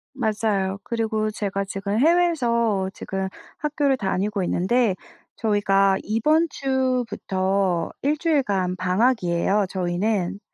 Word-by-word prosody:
맞아요. 210 -5 0
그리고 220 -2 -1
제가 200 -1 -2
지금 195 +2 -3
해외에서 240 - +2
지금 190 0 -4 0.3
학교를 290 -2 0
다니고 195 -1 -1
있는데 195 +4 +1 0.4
저희가 195 -3 +2
이번 305 +10 +2
주부터 200 -10 -1
1 295 +2 +1
주일간 205 - 0
방학이에요 185 0 +1
저희는. 185 +1 -1
210 Hz, 250 characters per minute, -23 LUFS, 190-250 Hz, 0.4 s, 해외에서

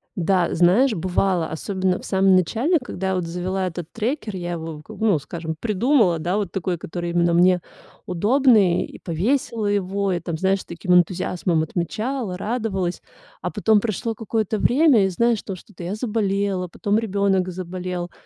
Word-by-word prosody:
Да, 180 0 +1
знаешь, 200 +9 +4
бывало, 180 -1 0
особенно 185 +3 -1
в - - -11
самом 190 -1 +3
начале, 235 - +2
когда 195 -8 -5
я 190 - 0
вот 180 - -1
завела 185 +3 -2
этот 175 -1 -6
трекер, 225 -2 -3
я 175 -1 -4
его 160 -2 -6
как - - -11
бы, 225 - +1
ну, 195 -6 +4
скажем, 160 +2 -6
придумала, 215 - +2
да, 175 +5 -1
вот 200 -4 -2
такой, 180 -1 -2
который 175 +1 -5
именно 170 0 +2
мне 180 +1 +4 0.4
удобный, 210 -1 +3
и - - -12
повесила 220 - -1
его, 200 -1 0
и 175 - 0
там, 170 -1 -4
знаешь, 190 +3 +1
с - - -14
таким 180 +2 -1
энтузиазмом 175 -1 +2
отмечала, 200 - -3
радовалась. 195 -4 -2 0.4
А - - -2
потом 220 -1 +3
прошло 225 +1 -2
какое-то 220 -1 -2
время, 260 -5 +4
и, 190 - +1
знаешь, 235 +3 +1
то 195 - -6
что-то 185 0 -12
я 180 +4 -3
заболела, 200 -4 -1
потом 205 +4 0
ребёнок 200 -3 +1
заболел, 180 0 -5
190 Hz, 170 wpm, -22 LUFS, 175-215 Hz, 0.4 s, знаешь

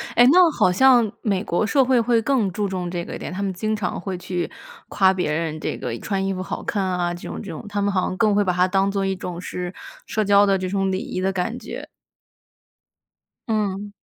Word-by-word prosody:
哎， 240 - +7
那 355 -1 +7
好 180 - +3
像 240 +1 +5
美 200 -3 0
国 175 +4 0
社 270 +3 +3
会 255 -1 +3
会 230 0 +2
更 225 -6 +1
注 205 +2 -1
重 180 -2 -3
这 175 -1 -3
个 - - -6
一 - - -7
点， - - -6
他 195 +2 -3
们 190 -1 -1
经 215 +4 -1
常 210 -3 -3
会 185 0 -4
去 180 -2 -3 0.4
夸 190 -1 +4
别 180 -5 -1
人 155 0 -2
这 - - -3
个 120 -2 -4
穿 195 -2 -2
衣 195 - 0
服 185 - -4
好 185 - -5
看 200 -2 -1
啊， 180 -2 -1
这 175 - -8
种 - - -5
这 200 -6 -7
种， 160 - -8
他 205 0 -2
们 200 - +1
好 190 -2 +1
像 185 - -2
更 215 -3 +3
会 205 0 +3
把 180 -2 0
它 180 +1 +3
当 195 +1 +2
作 195 -1 -1
一 190 0 0
种 180 -1 -6
是 180 0 -5 0.3
社 215 - -1
交 200 0 +5
的 195 -1 +3
这 185 0 -3
种 195 0 0
礼 185 - 0
仪 255 -5 -4
的 190 +1 +1
感 190 +6 -2
觉。 - - -8 1.6
嗯。 205 -2 -1
195 Hz, 260 characters per minute, -22 LUFS, 180-210 Hz, 1.6 s, 哎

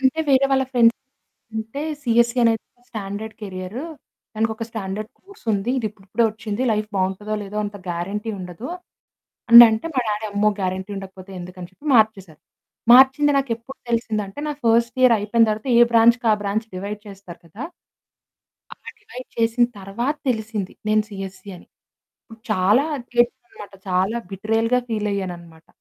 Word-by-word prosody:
అంటే 270 +4 +2
వేరే 275 0 +5
వాళ్ళ 265 0 +3
ఫ్రెండ్స్ 235 -1 +5 0.6
అంటే 225 +7 -4 0.2
సీఎస్‌సీ 235 0 +2
అనేది 225 -1 +3 0.3
స్టాండర్డ్ 215 +1 -6
కేరియరూ. 190 +6 -6 0.5
దానికి 220 +1 0
ఒక 225 - -5
స్టాండర్డ్ 215 +1 -5
కోర్స్ 395 -6 -18
ఉంది. 205 +4 -1
ఇది 225 - -2
ఇప్పుడిప్పుడే 210 +3 -2
వచ్చింది 215 +2 -4
లైఫ్ 215 0 -1
బాగుంటుందో 190 +3 -1
లేదో! 200 +1 -8
అంత 205 0 -6
గ్యారంటీ 195 +6 -3
ఉండదు. 180 +6 -7 0.8
అని 235 0 +13
అంటే 220 +7 -2
మా 255 - +2
డాడీ 210 +1 -2
అమ్మో! 210 +1 +3
గ్యారంటీ 190 +1 -3
ఉండకపోతే 190 0 -9
ఎందుకని 180 0 -9
చెప్పి 280 +11 -16
మార్చేసారు. 195 -8 +2 0.5
మార్చింది 265 +3 +6
నాకెప్పుడు 240 0 -4
తెలిసిందంటే 220 -1 -2
నాకు 295 -1 -5
ఫస్ట్ 235 +2 +3
ఇయర్ 250 -2 +7
అయిపోయిన 225 +3 +3
తరువాత 215 +5 -4
ఏ - - +7
బ్రాంచ్‌కి 235 +1 +5
ఆ - - +5
బ్రాంచ్ 210 +2 -2
డివైడ్ 200 +3 -5
చేస్తారు 195 -4 -12
కదా! 205 - -8 1.1
అలా - - -13 0.2
డివైడ్ 340 - -10
చేసిన 230 +1 +3
తరువాత 235 +10 -3
తెలిసింది. 220 -5 -2 0.2
నేను 215 0 +3
సీఎస్‌సీ 195 -1 -8
అని. - - -16 0.8
చాలా 215 +8 +3 0.4
ఏడ్చాను. 245 - -10
చాలా 190 +6 +1
బిట్రేయల్‌గా 225 +5 +1
ఫీల్ 210 -2 -1
అయ్యానన్నమాట. 170 -4 -7
215 Hz, 145 wpm, -22 LUFS, 195-235 Hz, 1.1 s, అని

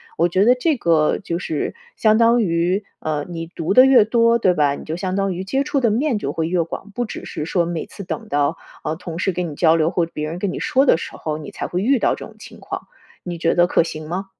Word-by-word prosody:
我 170 +1 +2
觉 190 +3 +2
得 245 - +7
这 270 +4 0
个 165 -7 +2
就 170 -4 -4
是 160 -5 -3 0.2
相 215 0 +4
当 235 +1 +5
于， 175 +2 0 0.2
呃， 150 -2 -2
你 165 -1 -5
读 165 +1 -2
得 255 - +8
越 250 -5 +6
多， 230 +1 +3
对 185 -6 +3
吧？ 145 -4 +2
你 - - -10
就 155 - -3
相 185 +1 -3
当 195 -1 0
于 180 +2 -4
接 270 +8 0
触 280 -1 0
的 235 - +3
面 240 +2 0
就 140 - -3
会 160 +2 -2
越 175 0 +1
广， 180 +5 -6
不 245 - -1
只 220 - -7
是 150 - -5
说 175 +1 +1
每 170 -1 -4
次 200 - -9
等 220 +4 -5
到， 145 +2 +1 0.3
呃， 155 - -2
同 165 -1 -7
事 190 +2 0
跟 180 -1 -2
你 150 - -8
交 160 +1 +4
流 160 -1 +2
或 175 -1 0
别 155 -2 -5
人 165 - -5
跟 185 0 -2
你 - - -4
说 270 +2 +2
的 255 - +5
时 - - -7
候， 155 -1 -4
你 150 - -8
才 - - -5
会 180 - -2
遇 265 +6 +3
到 - - +2
这 - - -7
种 - - -17
情 - - -13
况。 - - -6 0.4
你 175 -2 -5
觉 165 - +1
得 175 - +5
可 - - +3
行 155 -2 -5
吗？ 185 +4 -3
175 Hz, 290 characters per minute, -20 LUFS, 165-215 Hz, 0.4 s, 得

